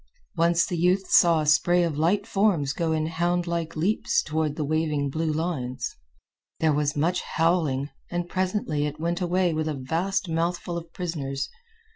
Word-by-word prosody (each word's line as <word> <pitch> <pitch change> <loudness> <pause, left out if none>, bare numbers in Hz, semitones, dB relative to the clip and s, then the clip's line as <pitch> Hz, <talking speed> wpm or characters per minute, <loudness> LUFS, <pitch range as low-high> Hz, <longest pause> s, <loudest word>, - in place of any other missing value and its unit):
Once 170 0 +3
the 175 - -3
youth 185 +3 +2
saw 170 -3 +6
a - - -2
spray 175 +4 +4
of 165 -3 -1
light 180 +7 +1
forms 195 -10 +1
go 165 +3 -1
in 155 -1 0
houndlike 170 0 -1
leaps 180 +8 +1
toward 155 -1 -1
the 155 - -2
waving 150 -2 0
blue 160 +2 -1
lines. 150 -6 -3 0.6
There 160 -2 +3
was 145 0 0
much 170 +5 +1
howling, 155 -5 0 0.2
and 175 0 -2
presently 185 -6 -1
it 150 +1 -7
went 170 +3 -1
away 180 -1 +1
with 155 0 -1
a 155 - -2
vast 170 +10 -1
mouthful 170 +1 -1
of 170 -1 -6
prisoners. 140 -7 -3
165 Hz, 165 wpm, -25 LUFS, 150-175 Hz, 0.6 s, saw